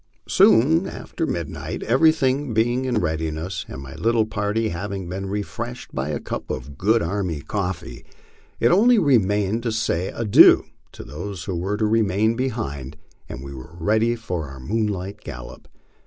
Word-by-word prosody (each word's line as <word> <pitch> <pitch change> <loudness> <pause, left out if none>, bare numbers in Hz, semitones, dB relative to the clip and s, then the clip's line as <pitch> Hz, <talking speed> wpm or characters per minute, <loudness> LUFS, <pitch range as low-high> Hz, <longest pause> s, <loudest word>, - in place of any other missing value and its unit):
Soon 155 - +5
after 165 - -4
midnight, 85 -4 -4
everything 135 -1 +2
being 120 +4 +1
in 125 -3 0
readiness, 80 -1 -2
and 70 - -8
my 65 -1 -9
little 115 0 +1
party 110 +1 -1
hav 95 +4 -4
ing 95 -3 -4
been 95 +2 -4
refreshed 120 +4 -5
by 65 +3 -2
a 75 - -2
cup - - -6
of 65 +3 -5
good 110 +7 +2
army 85 -4 -2
coffee, 90 +1 -4 0.6
it - - +4
only 230 +7 +5
remained 105 - +2
to 115 -1 -1
say 95 -5 0
adieu 110 -3 +6 0.3
to - - -9
those 85 +5 -6
who 90 - -3
were 95 +4 -2
to 110 - +1
remain 110 0 +2
behind, 75 - -3 0.3
and 65 - -7
we 70 0 -8
were 65 +6 -11
ready 110 +6 +2
for 90 -9 -4
our 65 0 -10
moonlight 100 - -2
gallop. - - -9
105 Hz, 160 wpm, -23 LUFS, 85-115 Hz, 0.6 s, adieu